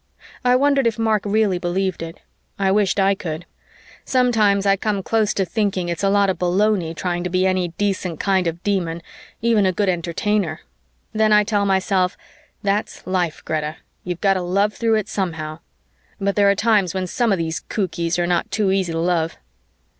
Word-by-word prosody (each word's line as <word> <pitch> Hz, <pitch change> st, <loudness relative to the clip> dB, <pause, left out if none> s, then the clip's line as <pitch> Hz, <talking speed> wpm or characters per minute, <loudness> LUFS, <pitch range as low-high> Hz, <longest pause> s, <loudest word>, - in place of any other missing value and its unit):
I 250 Hz, 0 st, +4 dB
wondered 275 Hz, -1 st, +3 dB
if 230 Hz, -, -1 dB
Mark 220 Hz, -2 st, +1 dB
really 205 Hz, -3 st, +1 dB
believed 185 Hz, +1 st, -1 dB
it. 165 Hz, 0 st, -7 dB, 0.4 s
I 195 Hz, -1 st, +1 dB
wished 200 Hz, 0 st, +2 dB
I 195 Hz, 0 st, +4 dB
could. 165 Hz, -3 st, -5 dB, 0.6 s
Sometimes 220 Hz, -6 st, +2 dB
I 195 Hz, 0 st, +4 dB
come 200 Hz, -1 st, -2 dB
close 220 Hz, 0 st, +1 dB
to 195 Hz, -, +1 dB
thinking 190 Hz, -2 st, -1 dB
it's 170 Hz, -1 st, -3 dB
a 195 Hz, -, +2 dB
lot 200 Hz, 0 st, +3 dB
of -, -, -7 dB
baloney 180 Hz, -2 st, +1 dB
trying 175 Hz, +1 st, -2 dB
to 180 Hz, -, -2 dB
be 185 Hz, +1 st, +1 dB
any 185 Hz, -1 st, +1 dB
decent 190 Hz, -5 st, -1 dB
kind 190 Hz, -3 st, +1 dB
of 165 Hz, +1 st, -4 dB
Demon, 170 Hz, -5 st, -1 dB, 0.4 s
even 230 Hz, -3 st, +3 dB
a -, -, +3 dB
good 195 Hz, +2 st, 0 dB
Entertainer. 175 Hz, 0 st, -1 dB, 0.5 s
Then 215 Hz, 0 st, +2 dB
I 210 Hz, 0 st, +6 dB
tell 205 Hz, -1 st, 0 dB
myself, 190 Hz, -1 st, +1 dB, 0.5 s
"That's 205 Hz, +1 st, -2 dB
life, 180 Hz, -4 st, -2 dB
Greta. 155 Hz, 0 st, -2 dB, 0.3 s
You've 180 Hz, -1 st, -5 dB
got 195 Hz, -2 st, +4 dB
to 185 Hz, -, -2 dB
love 200 Hz, +4 st, +1 dB
through 230 Hz, -1 st, +1 dB
it 215 Hz, -2 st, -1 dB
somehow." 160 Hz, -6 st, -3 dB, 0.6 s
But 200 Hz, 0 st, 0 dB
there 200 Hz, -1 st, +4 dB
are 200 Hz, -, +3 dB
times 205 Hz, -4 st, +2 dB
when 185 Hz, -1 st, -1 dB
some 230 Hz, +5 st, 0 dB
of 195 Hz, -, +2 dB
these 160 Hz, -3 st, -2 dB
cookies 170 Hz, -, -2 dB
are 175 Hz, -, +1 dB
not 175 Hz, -1 st, 0 dB
too 195 Hz, 0 st, +1 dB
easy 190 Hz, -3 st, 0 dB
to 165 Hz, -, -1 dB
love. 165 Hz, -1 st, 0 dB
195 Hz, 190 wpm, -21 LUFS, 175-210 Hz, 0.6 s, I